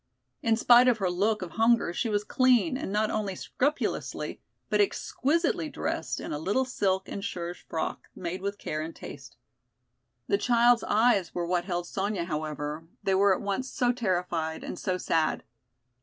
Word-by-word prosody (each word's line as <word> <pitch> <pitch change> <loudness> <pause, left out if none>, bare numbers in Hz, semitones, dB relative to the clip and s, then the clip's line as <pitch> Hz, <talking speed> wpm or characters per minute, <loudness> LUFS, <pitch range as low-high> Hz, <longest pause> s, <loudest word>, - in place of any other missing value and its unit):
In 225 -1 +3
spite 240 +2 +7
of 245 -3 +4
her 190 -4 0
look 205 +3 +1
of 175 - -7
hunger 225 -4 +3
she 230 - -1
was 205 -1 0
clean 255 +5 +3
and 260 - -4
not 215 +1 +1
only 205 -3 -2
scrupulously, 285 +10 -2 0.3
but - - +3
exquisitely 325 -4 0
dressed - - -3
in - - -5
a 150 - -3
little 205 +11 +1
silk 190 -6 0
and 200 - -5
serge 175 -1 -4
frock 160 - -3
made 185 +1 -4
with 200 +1 -3
care 155 -5 -3
and 160 +1 -6
taste. - - -10 0.9
The 400 - +1
child's 240 -1 +4
eyes 210 -4 +2
were 175 -1 -1
what 175 0 0
held 175 -2 -2
Sonya, 195 0 -2
however, 155 -1 -4 0.2
they 195 - +2
were 195 0 +5
at - - -7
once 205 +7 -2
so 245 -2 +1
terrified 180 -8 -1
and - - -6
so 185 -2 -1
sad. 160 -3 0
200 Hz, 170 wpm, -28 LUFS, 175-240 Hz, 0.9 s, spite